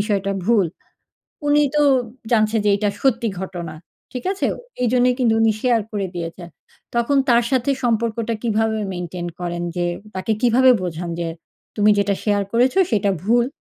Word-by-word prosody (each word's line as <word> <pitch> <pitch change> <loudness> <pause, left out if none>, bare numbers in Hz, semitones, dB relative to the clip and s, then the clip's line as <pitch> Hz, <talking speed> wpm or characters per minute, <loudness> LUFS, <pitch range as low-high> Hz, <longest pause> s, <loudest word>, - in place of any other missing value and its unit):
বিষয়টা 200 -2 0
ভুল। 210 -4 +3 0.8
উনি 295 0 +4
তো 295 - +4 0.5
জানছেন 215 0 +3
যে, - - +5
এটা 210 0 0
সত্যি 235 -4 +2
ঘটনা। 175 -4 -6 0.4
ঠিক 250 - -5
আছে? 395 - -1 0.4
এইজন্যই 250 +1 +3
কিন্তু 230 -3 +3
উনি 220 -1 +4
শেয়ার 240 -3 +3
করে 200 -2 -1
দিয়েছেন। 170 +1 -6 0.5
তখন 235 +4 +1
তার 235 0 +4
সাথে 260 0 +1
সম্পর্কটা 230 0 0
কিভাবে 220 -1 0
মেইনটেইন 175 0 -5
করেন? 175 0 -3
যে, 175 0 0 0.3
তাকে 185 +4 -1
কিভাবে 250 +2 +5
বোঝান 170 0 -4
যে, 170 - -2 0.5
তুমি 210 0 +4
যেটা 200 0 +2
শেয়ার 205 -1 +2
করেছ 250 +2 +3 0.2
সেটা 205 -1 +2
ভুল। 240 +2 +3
220 Hz, 155 wpm, -21 LUFS, 190-240 Hz, 0.8 s, যে